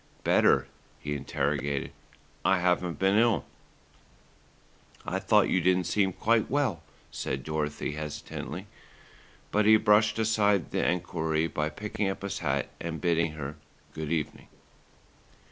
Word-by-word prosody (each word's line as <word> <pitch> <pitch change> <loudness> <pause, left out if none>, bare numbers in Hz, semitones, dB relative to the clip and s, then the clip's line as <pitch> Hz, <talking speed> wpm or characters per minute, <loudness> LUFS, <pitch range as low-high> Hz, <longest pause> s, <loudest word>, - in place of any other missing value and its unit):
"Better?" 65 - +4 0.3
he 75 - -4
interrogated. 70 0 -2 0.5
"I 95 - +4
haven't 90 -1 +1
been 95 +2 +3
ill." 115 - +3 1.6
"I - - -1
thought - - +4
you 95 - +2
didn't 90 +1 +3
seem 95 +2 +1
quite 110 +4 +1
well," 130 - 0 0.3
said 65 0 -3
Dorothy 75 -1 -2
hesitatingly; 75 0 -6 0.9
but 105 0 +2
he 110 0 +8
brushed 105 0 +4
aside 105 -5 +2
the - - 0
enquiry 80 -3 0
by 75 -2 -1
picking 105 +4 -3
up 95 - -5
his 100 - -3
hat 70 -3 -1
and 80 -1 -4
bidding 85 -1 +1
her 75 0 -6 0.4
"good 80 0 -5
evening." 80 -3 -3
85 Hz, 130 wpm, -28 LUFS, 75-105 Hz, 1.6 s, he